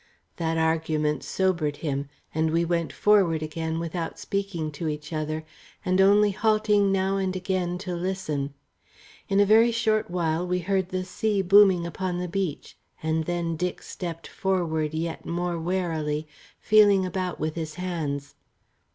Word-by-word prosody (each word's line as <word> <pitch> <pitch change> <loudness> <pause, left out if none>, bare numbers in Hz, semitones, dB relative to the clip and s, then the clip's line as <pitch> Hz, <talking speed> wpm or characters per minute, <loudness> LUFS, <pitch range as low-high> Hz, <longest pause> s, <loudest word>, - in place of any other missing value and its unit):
That 165 -1 -1
argument 160 -2 0
sobered 170 -6 0
him, 140 -1 -2 0.2
and 160 +1 +1
we 165 +2 +1
went 170 -1 -1
forward 185 -7 +3
again 160 +1 -3
without 165 0 -4
speaking 195 -6 -3
to 155 +3 -4
each 150 +1 -4
other, 155 0 -3 0.4
and 185 +1 +3
only 205 +1 +5
halting 210 -1 +2
now 195 0 +1
and 190 -1 -1
again 185 -1 -1
to 180 - -3
listen. 170 -6 -3 0.7
In 195 - +3
a 205 - +6
very 225 +3 +6
short 220 -3 +1
while 170 0 0
we 180 0 +1
heard 190 0 0
the 185 0 -2
sea 200 +2 0
booming 190 -2 +6
upon 180 +1 -3
the 180 0 -2
beach, 180 -4 -3 0.3
and 160 0 0
then 170 -1 -1
Dick 180 +2 -3
stepped 165 -2 -6
forward 160 -5 -1
yet 165 +1 -3
more 175 0 -2
warily, 160 -4 -1 0.3
feeling 205 -3 +5
about 185 0 -3
with 155 0 -1
his 160 -2 -5
hands. 155 -6 -3
175 Hz, 150 wpm, -26 LUFS, 160-190 Hz, 0.7 s, a